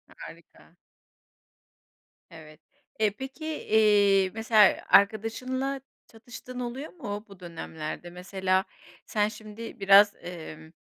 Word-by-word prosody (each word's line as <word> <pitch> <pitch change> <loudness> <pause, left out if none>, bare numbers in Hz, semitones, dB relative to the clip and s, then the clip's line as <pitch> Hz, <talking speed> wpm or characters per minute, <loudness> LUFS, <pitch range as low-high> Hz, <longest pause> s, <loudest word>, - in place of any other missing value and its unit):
Harika. - - -14 1.5
Evet. 155 -3 -14 0.4
E, 215 -1 +3
peki, 265 +8 -9
eee, 205 -9 +3
mesela, 220 -2 +4
arkadaşınla 255 +6 +2 0.3
çatıştığın 245 +2 -11
oluyor 250 +5 -6
mu 210 - -6
bu 195 -3 -15
dönemlerde? 165 -1 -7
Mesela, 185 +2 -1 0.4
sen 210 -1 +1
şimdi 215 +1 -9
biraz, 200 +1 +6
emm, 160 -2 -9
210 Hz, 95 wpm, -27 LUFS, 185-230 Hz, 1.5 s, biraz